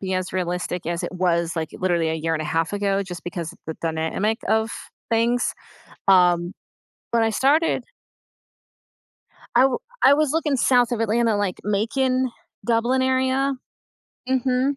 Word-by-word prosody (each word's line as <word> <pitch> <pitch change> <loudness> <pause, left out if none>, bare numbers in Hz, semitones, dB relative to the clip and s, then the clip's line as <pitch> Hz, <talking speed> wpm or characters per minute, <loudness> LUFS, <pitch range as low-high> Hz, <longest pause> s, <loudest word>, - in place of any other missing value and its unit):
be 190 -1 -2
as 185 0 -2
realistic 180 -1 -3
as 170 +1 -2
it 175 - -4
was, 170 -2 0
like, 160 -1 -2
literally 175 -3 +1
a - - -1
year 160 +1 -1
and 155 - -2
a - - -5
half 165 +2 0
ago, 200 -1 0
just 180 -4 -8
because 175 -3 -5
the 160 - -4
dynamic 165 +8 -1
of 220 +1 +2 0.4
things. 235 +2 +1 0.5
Um, 180 -1 +4 0.6
but 230 - +3
I 225 - +2
started 280 +1 +2 1.7
I 245 - +6
w 270 - +2 0.2
I 275 - +7
was 300 -1 +1
looking 300 -4 +1
south 245 -1 +3
of 230 - -1
Atlanta, 225 0 +2
like, 200 -3 -2
Macon, 255 +5 +1 0.3
Dublin 240 +3 +2
area. 260 +1 +1 0.7
Mhm. 260 +1 +1
210 Hz, 150 wpm, -23 LUFS, 175-255 Hz, 1.7 s, I